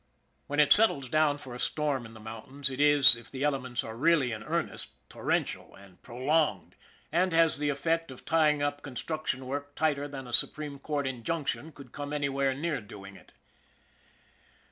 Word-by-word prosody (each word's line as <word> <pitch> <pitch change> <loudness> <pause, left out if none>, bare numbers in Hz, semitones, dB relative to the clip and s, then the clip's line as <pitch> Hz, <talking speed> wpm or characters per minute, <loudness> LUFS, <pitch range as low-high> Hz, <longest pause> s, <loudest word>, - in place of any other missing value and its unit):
When 145 +1 -2
it 150 - +7
settles 170 - +7
down 155 -1 +2
for 130 -3 -10
a 125 - -8
storm 140 -6 -1
in 115 - -15
the - - -12
mountains, 120 +6 -5
it 130 +2 -3
is, 145 -4 +7
if 115 - -12
the 135 +1 -5
elements 130 -4 -1
are 110 - -7
really 145 -1 +2
in 110 -2 -5
earnest, - - -4 0.2
torrential, - - -2
and 95 -2 -18
prolonged, 125 - -1 0.4
and 180 +3 +2
has 165 -3 +3
the 150 0 0
effect 165 +3 -1
of 130 - -12
tying 150 -3 +2
up 145 0 -2
con 135 -3 -9
struction 155 -3 -3
work 145 +2 -5
tighter 145 -2 0
than 135 -2 -8
a 120 - -9
supreme 145 +3 0
court 145 -1 -3
injunction 140 +5 -3
could 135 -4 -14
come 145 0 -6
anywhere 140 -2 0
near 150 -1 -2
doing 100 -1 -12
it. 90 - -18
140 Hz, 180 wpm, -29 LUFS, 125-150 Hz, 0.4 s, it